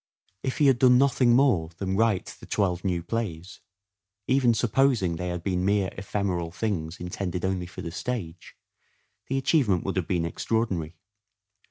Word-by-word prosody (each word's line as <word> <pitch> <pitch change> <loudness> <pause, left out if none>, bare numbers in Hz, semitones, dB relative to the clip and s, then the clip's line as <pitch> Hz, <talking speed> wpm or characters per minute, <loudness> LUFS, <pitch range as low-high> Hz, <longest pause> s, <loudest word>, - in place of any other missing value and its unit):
If 130 - -3
he 150 - +3
had 135 -3 +4
done 125 -1 +6
nothing 125 -2 +4
more 120 - +3
than 95 -1 -2
write 110 -3 +1
the - - -12
twelve 90 -4 0
new 90 -3 -1
plays, 95 -4 -4 0.7
even 130 -3 +3
supposing 120 -6 +2
they 90 +2 -4
had 90 -1 -4
been 90 -2 -1
mere 100 -1 +1
ephemeral 95 -4 -2
things 90 -4 -3
intended 90 0 -3
only 95 -2 -1
for 95 +1 -9
the 85 - -5
stage, 90 -3 -5 0.7
the 135 - -1
achievement 130 - +2
would 95 - -3
have 90 - -1
been 85 -3 0
extraordinary. 90 -4 -2
95 Hz, 160 wpm, -26 LUFS, 90-120 Hz, 0.7 s, done